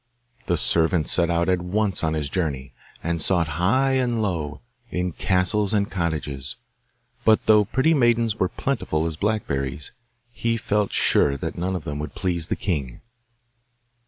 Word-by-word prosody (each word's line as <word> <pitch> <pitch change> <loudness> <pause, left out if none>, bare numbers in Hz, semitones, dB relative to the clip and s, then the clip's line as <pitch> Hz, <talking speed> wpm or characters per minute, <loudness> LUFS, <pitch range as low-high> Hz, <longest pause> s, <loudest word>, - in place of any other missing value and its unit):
The 85 - +2
servant 80 0 +2
set 85 -1 +2
out 85 0 +1
at 90 -1 +2
once 100 +2 -1
on 80 0 +1
his 75 -2 -1
journey, 70 -5 -3 0.3
and 85 -1 -1
sought 85 0 +2
high 130 +9 +3
and 125 -3 +1
low 85 -8 -2 0.3
in 90 -2 -2
castles 95 +4 +1
and 100 -1 0
cottages; 75 -7 -2 0.7
but 110 -1 +4
though 105 -1 +5
pretty 130 +10 +2
maidens 120 -5 +2
were 90 - +2
plentiful 95 - -1
as 80 -1 -2
blackberries, 75 - -2 0.4
he 115 -1 -1
felt 105 -1 0
sure 70 -1 +3
that - - -4
none 95 +2 -2
of 90 - -4
them 75 0 -4
would 75 -1 -6
please 85 -4 -1
the - - -1
king. 70 -10 -3
90 Hz, 160 wpm, -24 LUFS, 80-105 Hz, 0.7 s, though